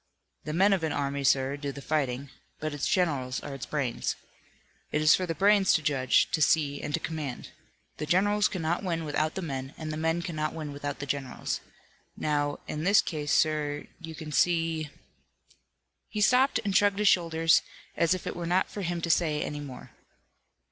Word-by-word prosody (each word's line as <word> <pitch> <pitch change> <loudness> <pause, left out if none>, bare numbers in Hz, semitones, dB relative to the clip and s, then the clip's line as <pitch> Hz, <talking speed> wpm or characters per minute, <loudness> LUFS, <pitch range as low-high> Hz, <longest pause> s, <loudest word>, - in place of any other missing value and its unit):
"The 150 - -3
men 195 +4 +4
of 185 -4 0
an 160 - 0
army, 140 0 -2
sir, 135 0 +2
do 140 -1 -4
the 140 - -9
fighting, 140 -2 -2 0.3
but 155 -1 -3
its 145 - -2
generals 140 -9 0
are 145 - -6
its 135 - -6
brains. 140 -6 -2 0.8
It 150 - +1
is 155 0 +6
for 185 - +1
the 165 - -2
brains 200 0 +4
to 155 - 0
judge, 135 -3 +2
to 160 - 0
see 150 -2 +2
and - - -4
to - - -2
command. 150 -6 -5 0.5
The 150 - -4
generals 205 +5 +3
cannot 170 0 -2
win 165 -3 -2
without 155 +1 -1
the 190 - -3
men, 135 -3 -5
and 155 -1 -5
the - - -4
men 165 +2 0
cannot 155 -2 -3
win 155 -3 -5
without 145 0 -4
the 145 - -5
generals. 135 -2 -3 0.6
Now, 145 -1 0
in 155 - -4
this 200 +3 +5
case, 150 -3 -3
sir, 150 -1 +1
you 165 -2 -8
can 155 -1 -7
see 165 -2 +1 0.6
" - - -46
He 210 - -4
stopped 250 +3 +4
and 200 -2 -1
shrugged 205 -1 +4
his 210 0 +2
shoulders, 165 -3 +4 0.3
as 170 +2 +3
if 185 - -8
it - - -4
were 170 -1 -4
not 180 +2 +1
for 205 - -5
him 175 -2 -2
to 170 - -2
say 155 -3 +1
any 150 - -4
more. 140 -3 -9
155 Hz, 195 wpm, -28 LUFS, 145-175 Hz, 0.8 s, is